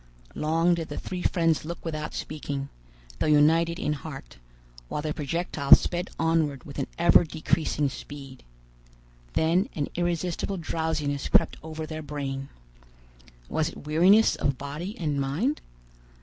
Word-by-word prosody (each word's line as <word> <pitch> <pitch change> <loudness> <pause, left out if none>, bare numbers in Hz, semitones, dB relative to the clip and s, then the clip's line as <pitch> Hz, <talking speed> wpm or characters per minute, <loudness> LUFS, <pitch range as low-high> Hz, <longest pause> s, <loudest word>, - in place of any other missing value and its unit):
Long 165 +3 +2
did 165 -2 -3
the - - -5
three 180 -1 -5
friends 165 -3 +2
look 170 +3 -7
without 155 -2 -4
speaking, 140 -2 -4 0.5
though - - +1
united 165 +3 +4
in 150 - -1
heart, 145 - -8 0.5
while 150 - -3
the 155 -1 -1
projectile 150 -1 +4
sped 175 +1 -3
onward 160 -5 +1
with 140 - -8
an - - -1
ever 170 +1 +6
decreasing 155 -2 0
speed. 135 -1 -9 0.9
Then 170 +5 +2
an 145 -2 -2
irresistible 175 +2 -1
drowsiness 155 -4 -2
crept - - +3
over 160 0 -6
their 155 0 -6
brain. 140 -2 -4 1.0
Was 160 - 0
it 165 - -11
weariness 180 +9 +5
of 140 -2 0
body 150 - -6
and 150 -4 -1
mind? 165 - 0
155 Hz, 135 wpm, -27 LUFS, 145-170 Hz, 1.0 s, ever